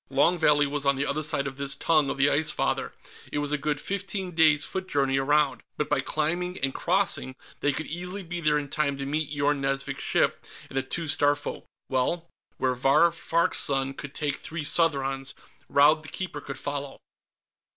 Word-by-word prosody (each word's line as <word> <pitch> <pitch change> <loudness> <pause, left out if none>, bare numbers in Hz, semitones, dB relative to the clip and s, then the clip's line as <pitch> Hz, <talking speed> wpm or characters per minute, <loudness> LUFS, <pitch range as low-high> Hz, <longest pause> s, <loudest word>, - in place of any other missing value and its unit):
Long 175 0 +3
Valley 145 -2 +4
was 140 0 -2
on 140 0 +3
the 140 +1 -1
other 155 - -1
side 150 -2 +1
of 135 -1 -5
this 140 0 +2
tongue 155 -4 +2
of - - -3
the 140 +1 +4
Ice 155 +2 +2
Father; - - -1 0.4
it - - -2
was 145 0 -1
a - - +2
good 145 0 -1
fifteen 195 +1 -3
days' 155 -3 +4
foot 190 0 -4
journey 135 -3 +1
around, 145 -1 +2 0.2
but 150 - -1
by 145 - +2
climbing 175 +6 -1
and 135 -1 +1
crossing, 175 -7 0 0.2
they 145 - +2
could 155 +4 -4
easily 180 +4 -5
be 175 0 -5
there 150 -1 +3
in 145 -1 -3
time 140 -1 -1
to 140 - -4
meet 150 +1 -1
Yorn 145 -1 0
Nazvik's 135 0 -1
ship - - +1 0.3
and - - -10
the - - +3
two 160 +6 -3
Starfolk. 145 -1 0 0.2
Well, 140 +6 0 0.3
where 130 -1 +1
Vahr 140 +7 +4
Farg's 170 0 +1
son 135 -1 0
could 140 0 -8
take 150 -2 -1
three 160 -1 -5
Southrons, 135 -4 +1 0.3
Raud 150 +2 +5
the 155 - -10
Keeper 175 -6 -5
could 140 0 -7
follow. 145 -1 -4
145 Hz, 195 wpm, -27 LUFS, 140-160 Hz, 0.4 s, Raud